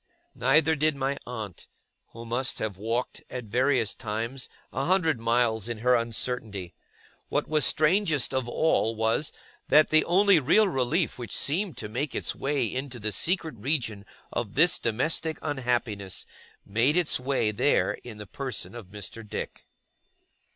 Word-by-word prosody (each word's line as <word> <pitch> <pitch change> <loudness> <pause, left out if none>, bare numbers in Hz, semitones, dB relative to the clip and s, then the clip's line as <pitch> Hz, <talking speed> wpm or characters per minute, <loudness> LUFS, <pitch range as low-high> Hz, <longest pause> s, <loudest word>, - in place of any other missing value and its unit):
Neither 155 +3 +3
did 155 0 +1
my 135 0 -1
aunt; 110 -7 -7 0.4
who 115 0 -11
must 120 +3 -1
have 110 -3 -3
walked, 115 +5 -2
at 125 - -5
various 120 +1 +1
times, 115 +3 -4 0.2
a 135 - -1
hundred 165 -7 +2
miles 115 -1 +1
in 120 - -3
her 125 +3 +3
uncertainty. 115 -5 -2 0.6
What - - 0
was 155 -2 +3
strangest 155 -3 +3
of 130 -2 -1
all 120 -5 +1
was, 115 +7 0 0.4
that 155 +1 +5
the 155 0 +6
only 190 0 +5
real 180 +10 +4
relief 150 0 0
which 120 -4 -3
seemed 165 - 0
to - - -4
make 125 +6 -3
its - - 0
way 135 -2 0
into 130 +3 -4
the 110 -1 -2
secret 165 - 0
region 115 -6 -1 0.3
of 110 -4 -3
this 165 +5 +4
domestic 155 +7 -1
unhappiness, 120 -9 -2 0.4
made 115 - +2
its 175 -7 +3
way 125 -4 0
there 125 +7 +2
in 115 -3 -9
the 105 - -8
person 130 +5 -4
of 120 -5 -9
Mr. 105 +3 -7
Dick. - - -6
125 Hz, 150 wpm, -27 LUFS, 115-150 Hz, 0.6 s, the